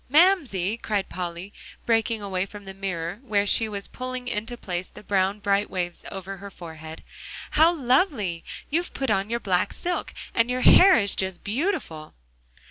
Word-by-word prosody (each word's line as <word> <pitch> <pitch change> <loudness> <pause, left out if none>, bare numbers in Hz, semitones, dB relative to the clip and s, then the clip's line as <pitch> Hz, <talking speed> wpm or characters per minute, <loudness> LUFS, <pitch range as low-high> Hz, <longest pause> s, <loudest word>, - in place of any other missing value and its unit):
"Mamsie!" 275 - +3
cried 210 -4 -2
Polly, 180 +2 -5 0.3
breaking 225 -1 +1
away 190 -1 -2
from 205 -1 -11
the 195 - -7
mirror 190 -1 -4
where 210 -6 +1
she 220 +2 +3
was 200 -1 -5
pulling 255 0 -6
into 230 +2 -3
place 180 -4 -4
the - - -13
bright 200 +1 0
brown 200 0 +2
waves 175 -2 -3
over 195 0 -6
her 200 +2 -9
forehead, 160 -3 -10 0.5
"how 320 +2 +6
lovely! 250 - +1 0.3
you've 345 +4 -1
put 270 -4 0
on 195 0 +1
your 235 +1 0
black 185 -5 +1
silk; 355 0 -3 0.2
and 230 +1 +2
your 250 0 0
hair 380 +7 +8
is 200 -3 +2
just 190 -2 -2
beautiful!" 210 - -2
205 Hz, 165 wpm, -25 LUFS, 185-250 Hz, 0.5 s, hair